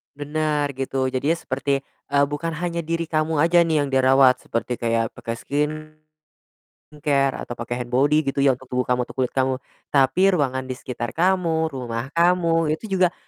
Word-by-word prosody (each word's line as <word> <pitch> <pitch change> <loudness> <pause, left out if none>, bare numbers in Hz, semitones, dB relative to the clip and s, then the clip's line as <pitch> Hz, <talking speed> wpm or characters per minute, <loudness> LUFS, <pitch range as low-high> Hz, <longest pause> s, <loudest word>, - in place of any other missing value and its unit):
Benar, 150 0 -1
gitu. 135 0 -1
Jadinya 135 +5 0
seperti, 140 -3 -2 0.3
eee, 140 0 +5
bukan 160 +3 -3
hanya 170 0 -3
diri 165 0 -2
kamu 155 -1 +1
aja 170 +1 +5
nih 155 -3 +2
yang 140 - -2
dirawat, 130 -1 +4
seperti 115 +1 -2
kayak 115 -1 0
pakai 115 - -6
skincare, 155 +3 -5 1.1
atau 120 - -6
pakai 120 +1 -4
hand 120 - -15
body 145 +3 +3
gitu 140 0 0
ya 135 -3 +3
untuk 130 - -15
tubuh 125 0 -1
kamu, 125 -1 0
untuk - - -12
kulit 125 - 0
kamu, 130 0 +1 0.4
tapi 180 +8 +4
ruangan 130 -4 -1
di 130 - -4
sekitar 120 -2 -6
kamu, 165 -3 +1
rumah 125 -1 -5
kamu, 165 -1 +2
itu 190 +3 -4
juga 180 -1 +3
145 Hz, 170 wpm, -23 LUFS, 130-160 Hz, 1.1 s, eee